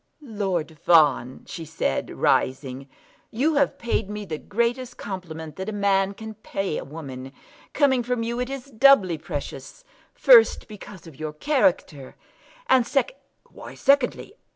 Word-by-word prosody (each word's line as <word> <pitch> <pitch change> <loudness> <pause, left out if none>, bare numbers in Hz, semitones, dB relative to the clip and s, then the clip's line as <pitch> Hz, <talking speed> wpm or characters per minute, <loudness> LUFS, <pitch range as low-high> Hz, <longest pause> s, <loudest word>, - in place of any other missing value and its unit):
"Lord 190 - -3
Fawn," 150 -7 +3
she 165 - -7
said, 160 - -2
rising, 135 0 -1 0.4
"you 285 +8 0
have 280 -1 +1
paid 235 -5 -2
me 210 0 -5
the 155 -5 -5
greatest 240 +3 -2
compliment 160 -6 -7
that 190 +2 -4
a - - -3
man 200 -1 +1
can 220 +1 -8
pay 195 -5 -4
a - - -7
woman. 135 -3 -9 0.4
Coming 270 -4 +3
from 245 -1 -2
you 235 +1 -3
it 250 +1 -2
is 270 -2 -6
doubly 220 - +5
precious; 175 - -7 0.3
first, - - +5
because 205 -3 -12
of 155 -4 -14
your 155 -1 -5
character; 160 - 0 0.5
and 250 -2 +4
secondly 280 - 0 0.2
" - - -33
"Why - - -11
secondly?" 275 -2 +1
200 Hz, 150 wpm, -24 LUFS, 160-250 Hz, 0.5 s, doubly